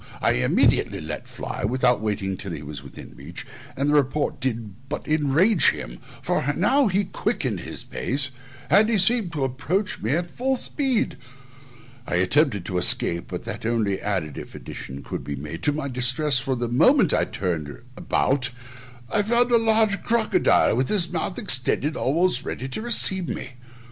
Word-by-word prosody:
I - - +2
immediately 65 - +2
let - - -6
fly, - - -6
without 125 +1 +1
waiting 100 -3 -2
till 95 -1 -7
he - - -7
was 75 -1 -7
within 70 - -12
reach, - - -10 0.3
and 140 +2 0
the 145 - +2
report 145 0 +1
did 115 -1 -5
but - - -5
enrage 155 +5 +3
him, - - -6 0.2
for - - 0
he 145 +3 -1
now 255 - +2 0.2
quickened - - -1
his - - -7
pace, 135 +1 -2 0.4
and 215 +1 +4
seemed 215 -2 +3
to 145 -4 -2
approach 155 +11 -2
me 130 +10 0
full 255 +10 -2
speed: 260 -2 -1 0.9
I - - -2
attempted 100 - +2
to 90 -2 -2
escape, 85 -1 +3
but - - -6
that - - -6
only 110 -4 -1
added 90 -8 -3
(if - - -10
an - - -9
addition 70 +2 -8
could - - -6
be 70 - -5
made) 75 +4 -7
to 145 - +1
my 145 -1 -3
distress; 130 +2 +2
for 130 +1 -2
the 120 -1 -2
moment 165 - +4
I - - +2
turned 85 -6 -3 0.3
about 130 -1 0 0.6
I 210 - +3
found 240 +3 +2
a 235 - +6
large 220 -2 +2
crocodile, 230 - +2
with 130 +2 0
his 180 -5 +2
mouth 175 +2 -3
extended 145 - +2
almost 170 +7 +1
ready 130 - -5
to 135 - -5
receive 190 -6 +3
me. 130 - -5
135 Hz, 170 wpm, -23 LUFS, -, 0.9 s, a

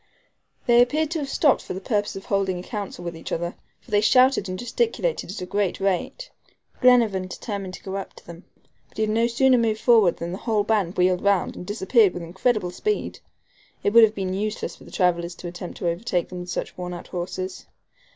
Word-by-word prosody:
They 240 0 +6
appeared 300 +5 +1
to 335 - -1
have 280 -2 -4
stopped 285 -1 +3
for - - -6
the - - -4
purpose 205 +1 -1
of 195 - -8
holding 195 -2 0
a 180 - -6
council 200 -4 -6
with 170 -1 -4
each 165 - -8
other, 170 +1 -2 0.3
for - - -19
they 205 -1 +4
shouted 255 -3 +4
and 185 - -3
gesticulated 460 - -1
at 190 - -6
a - - -3
great 200 0 -1
rate. 195 - -2 0.5
Glenarvan 230 -7 +4
determined 195 -1 -5
to - - -14
go 195 0 -4
up 195 - -7
to - - -16
them; 170 +2 -11 0.5
but - - -22
he 220 - +1
had 215 - 0
no 230 +2 +2
sooner 250 +1 +4
moved 220 -2 +1
forward 220 -8 +4
than 170 +1 -5
the 185 - -5
whole 220 -3 +1
band 205 -5 0
wheeled 180 0 +3
round, 200 -2 +2
and 180 - -8
disappeared 205 0 +3
with 175 - -5
incredible 190 +2 0
speed. 420 - -2 0.6
It 205 - +1
would 230 0 +9
have 220 -1 +4
been 190 -2 -2
useless 210 +2 -3
for - - -16
the - - -13
travelers 175 -2 0
to 175 - -8
attempt 175 0 -7
to 175 - -2
overtake 175 +1 -1
them 180 - -7
with 180 0 -7
such - - -4
wornout 180 -1 -6
horses. 185 +1 -5
195 Hz, 220 wpm, -24 LUFS, 180-230 Hz, 0.6 s, would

